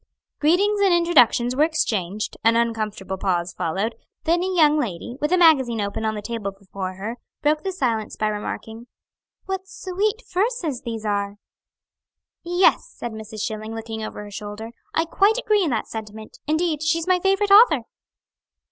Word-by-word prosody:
Greetings 400 +7 +3
and 390 -2 +4
introductions 250 -8 +4
were 290 - +4
exchanged; 215 - -1
an 230 0 +4
uncomfortable 215 -5 -1
pause 180 -2 -1
followed, 195 +8 -2 0.3
then 340 +1 +2
a 370 - -1
young 310 -4 +4
lady, 235 -1 -4
with 300 +2 0
a 365 - +4
magazine 270 -10 +5
open 200 +2 -2
on 220 0 0
the 210 - -6
table 230 -3 -3
before 195 -1 -7
her, 215 +5 -5 0.3
broke 300 +1 +2
the 385 - -2
silence 235 - -1
by 215 - 0
remarking: 220 +2 -5 0.6
"What 385 0 -4
sweet 410 +4 -2
verses 365 - -1
these 225 -3 -5
are!" 200 -1 -1 1.1
"Yes," 355 +8 +2
said 240 - -5
Mrs. 220 -1 -7
Schilling, 215 +1 -4
looking 225 0 -5
over 215 -1 -6
her 205 - -10
shoulder, 210 +2 -7 0.2
"I 325 - +1
quite 400 +7 +3
agree 425 -5 +2
in 330 - 0
that 230 -4 -1
sentiment. 215 0 -8
Indeed, 315 0 0
she's 325 +1 +1
my 370 -1 +3
favorite 390 +2 +1
author." 430 +5 +7
240 Hz, 165 wpm, -23 LUFS, 215-350 Hz, 1.1 s, author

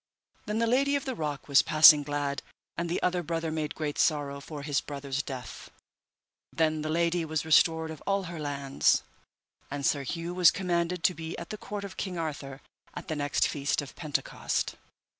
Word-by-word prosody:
Then 210 +1 -1
the 230 - +2
Lady 275 +4 +2
of 280 - -2
the 260 - -2
Rock 150 - -4
was 140 +1 +6
passing 155 -1 +8
glad, 145 -1 -2 0.3
and 170 +1 -3
the 170 - 0
other 180 0 +1
brother 165 0 -2
made 155 -1 -3
great 150 -2 -3
sorrow 145 -3 +1
for 150 -1 -8
his 145 -2 0
brother's 140 -1 -4
death. 130 -6 -8 0.8
Then 155 -1 +1
the 155 - -3
lady 170 +1 +1
was 160 -1 -2
restored 160 0 +4
of 155 - -9
all 195 0 +1
her 170 -2 -7
lands, 140 -2 +1 0.7
and 140 0 -4
Sir 140 - +2
Hue 165 +5 -4
was 180 -2 +7
commanded 175 -2 -1
to 180 - +4
be 160 -1 -6
at 170 - -7
the - - -3
court 205 0 -6
of 195 -1 -8
King 185 -3 -3
Arthur 145 -4 -5 0.3
at - - -8
the 155 - -1
next 145 -1 +1
feast 145 -1 -1
of 145 -2 -6
Pentecost. 150 -3 -2
160 Hz, 190 wpm, -29 LUFS, 145-170 Hz, 0.8 s, passing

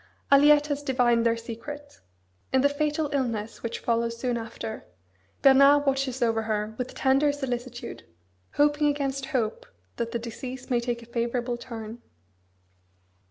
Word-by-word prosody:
Aliette 290 +1 +7
has 290 -1 -2
divined 245 -4 +2
their 230 0 +1
secret. 285 +6 -8 0.5
In 260 - +3
the 285 - +4
fatal 300 +1 -1
illness 230 -5 -2
which 230 0 -3
follows 230 0 -1
soon 245 0 -1
after, 225 -1 -6 0.6
Bernard 275 +2 +7
watches 270 -2 0
over 225 -1 +2
her 215 -1 -2
with 250 - -4
tender 275 +2 +3
solicitude; 250 -3 -5 0.5
hoping 295 +1 +3
against 275 -2 -1
hope 240 -7 -2 0.3
that 230 0 -2
the - - -1
disease 250 +3 -7
may 240 - +3
take 235 -1 -3
a - - -12
favourable 235 +1 -2
turn. 230 -1 -8
250 Hz, 140 wpm, -26 LUFS, 230-280 Hz, 0.6 s, Aliette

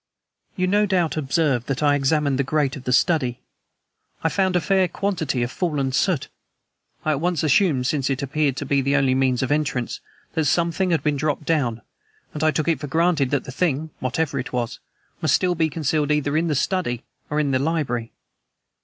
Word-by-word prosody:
"You 185 - 0
no 205 +3 +2
doubt 180 -4 +1
observed 140 -4 0
that 135 +2 -2
I 145 -1 +4
examined 145 -1 +1
the - - +3
grate 145 0 0
of 135 -3 -10
the 125 - -1
study. 130 -3 +2 0.8
I 160 - +3
found 190 +2 +1
a - - +4
fair 190 +1 +2
quantity 160 -10 -1
of 120 - -3
fallen 145 -6 -1
soot. 155 +2 +1 0.8
I 155 - +2
at 145 -1 -1
once 175 -3 0
assumed, 150 -3 +3
since 135 0 0
it 135 0 -1
appeared 140 -1 0
to 145 - -3
be 140 0 +2
the 140 +2 +1
only 135 -2 +3
means 130 -1 +1
of 130 - -2
entrance, 145 -5 -1 0.3
that 160 - 0
something 170 +6 +1
has 165 -2 +2
been 150 -1 0
dropped 150 +1 -1
down; 125 -8 0 0.5
and 150 - -3
I 155 - +5
took 155 0 -1
it 165 -5 +2
for 145 - -5
granted 160 -2 +2
that 140 -2 0
the - - -8
thing, 155 +1 -1
whatever 140 +2 -1
it 130 - -5
was, 120 -2 -3 0.4
must - - +3
still 180 -1 +1
be 160 -2 +1
concealed 150 -1 0
either 150 -1 +1
in 165 +2 +2
the 150 - 0
study 140 -7 -1 0.3
or 150 - 0
in 145 -2 +1
the 130 - +2
library. 135 -6 -1
150 Hz, 205 wpm, -23 LUFS, 135-165 Hz, 0.8 s, I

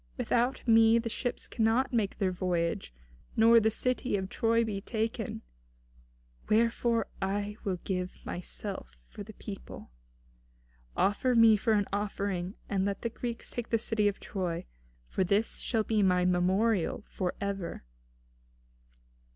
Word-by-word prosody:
Without 245 +2 0
me 225 0 +6
the 230 0 -1
ships 245 - -3
cannot 230 +4 +1
make 215 -4 0
their 195 -3 +1
voyage, 175 - -1 0.4
nor 230 +1 +7
the 220 0 +3
city 250 0 0
of 190 -1 -4
Troy 230 +2 +2
be 205 -3 -3
taken. 225 +1 -3 1.1
Wherefore 230 +1 +2 0.2
I 205 +2 -2
will 190 -3 -1
give 180 -1 -2
myself 175 - -5
for - - -10
the - - -9
people. - - -9 1.1
Offer 240 +5 +2
me 225 -1 +7
for 220 +2 +1
an 205 -1 +2
offering; 200 -2 -2
and 195 -2 0
let 200 0 -2
the 235 - 0
Greeks 235 0 -5
take 240 -2 -5
the 230 - +3
city 215 -2 +1
of 205 - -1
Troy, 180 -4 -3 0.4
for 190 - 0
this 200 +5 +1
shall 225 -3 0
be 215 -1 +1
my 180 -2 +3
memorial 185 +3 +2
for 180 -2 -3
ever." 195 - -4
205 Hz, 140 wpm, -30 LUFS, 190-230 Hz, 1.1 s, nor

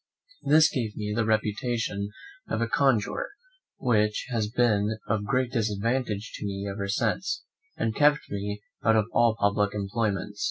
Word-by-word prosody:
This 155 +2 +6
gave 115 -7 -2
me 105 -1 -3
first - - -3
the 110 - 0
reputation 110 -1 0 0.4
of 110 - -1
a 115 - +2
conjurer, 125 -3 +1 0.5
which 105 -3 +1
has 110 -3 0
been 110 -2 +2
of 105 -1 0
great 125 +4 +1
disadvantage 110 -1 -1
to - - -7
me 100 0 -4
ever 100 0 -3
since, 115 - -1 0.3
and 110 -1 -1
kept 150 0 +3
me 105 +1 -4 0.2
out 115 - +4
of 110 -2 +3
all 120 -2 +4
public 100 0 +2
employments. 105 0 -2
110 Hz, 155 wpm, -27 LUFS, 105-120 Hz, 0.5 s, This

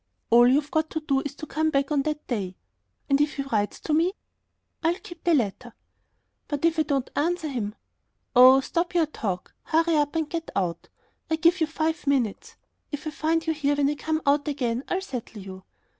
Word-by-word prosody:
"All 240 +1 +7
you've 285 +3 +2
got 315 0 +1
to 315 - -2
do 275 -3 +1
is 285 0 -6
to 310 - -7
come 315 +1 0
back 275 -1 0
on 290 -2 +3
that 305 +1 -3
day." 195 -7 -3 0.5
"And 275 0 +3
if 295 0 +1
he 275 - -2
writes 215 -6 -1
to 310 - -2
me?" 335 +5 +3 0.7
"I'll 335 +1 +2
keep 345 - -12
the 340 -2 +4
letter." 240 -1 -2 0.7
"But 290 +1 -1
if 330 -1 +2
I - - +6
don't 275 -4 -1
answer 335 +2 0
him?..." 225 -7 -3 0.6
"Oh, 255 +2 +8
stop 345 +5 -2
your 335 -2 +4
talk. 195 -11 -4
Hurry 325 0 +2
up 295 +1 +1
and 320 -2 0
get 330 0 -4
out! 175 -3 -2 0.4
I 320 - +2
give 335 +2 +3
you 320 - +3
five 315 0 -2
minutes. 255 -7 0 0.4
If 290 0 -5
I 310 - -2
find 320 +2 0
you 320 - +1
here 290 -2 +1
when 285 0 +2
I - - 0
come 315 +2 -2
out 285 +1 +2
again 250 -4 -1
I'll 365 - -1
settle 245 - -6
you." 190 -1 -10
290 Hz, 205 wpm, -26 LUFS, 255-320 Hz, 0.7 s, Oh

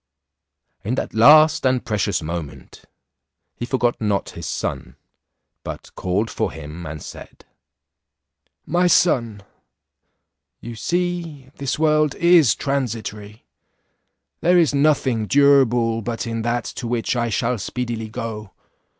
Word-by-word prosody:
In 115 +6 -1
that - - -4
last 155 +7 +6
and 130 -1 +1
precious 105 -6 -1
moment 80 -2 -7 0.7
he 120 - -5
forgot 125 -2 0
not 105 -2 -1
his - - -7
son, - - -4 0.7
but - - -8
called 95 +5 -1
for - - -2
him, 80 +2 -9
and 75 0 -7
said, - - -12 1.2
"My 180 +1 +2
son, 115 - +2 1.2
you 120 0 -8
see 170 -1 -3
this 140 -1 -2
world 155 -2 +2
is 170 -8 +5
transitory; 110 -6 -4 1.0
there 180 +1 +3
is 165 -4 +3
nothing 140 -6 +1
durable 125 -5 +3
but 115 +2 -4
in 115 -1 -3
that 120 +1 -1 0.2
to 120 - -4
which 120 +1 -1
I 120 -1 0
shall 115 +2 -1
speedily 115 +1 -4
go. 105 -3 -6
120 Hz, 120 wpm, -21 LUFS, 110-140 Hz, 1.2 s, last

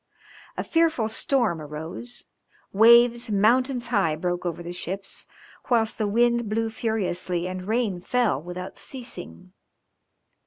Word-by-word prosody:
A - - -1
fearful 325 -9 +2
storm 220 - 0
arose, 160 +11 -7 0.5
waves 235 +3 +6
mountains 240 +4 +2
high 195 -9 +2
broke 175 +2 -2
over 175 0 -4
the 170 - -6
ships, 190 +3 -4 0.4
whilst 225 -3 +2
the 215 - +1
wind 235 +1 +2
blew 225 +1 -1
furiously 185 -6 -2
and 185 0 -6
rain 220 -5 0
fell 225 - +1
without 180 +2 -7
ceasing. 185 -7 -10
215 Hz, 120 wpm, -25 LUFS, 180-240 Hz, 0.5 s, waves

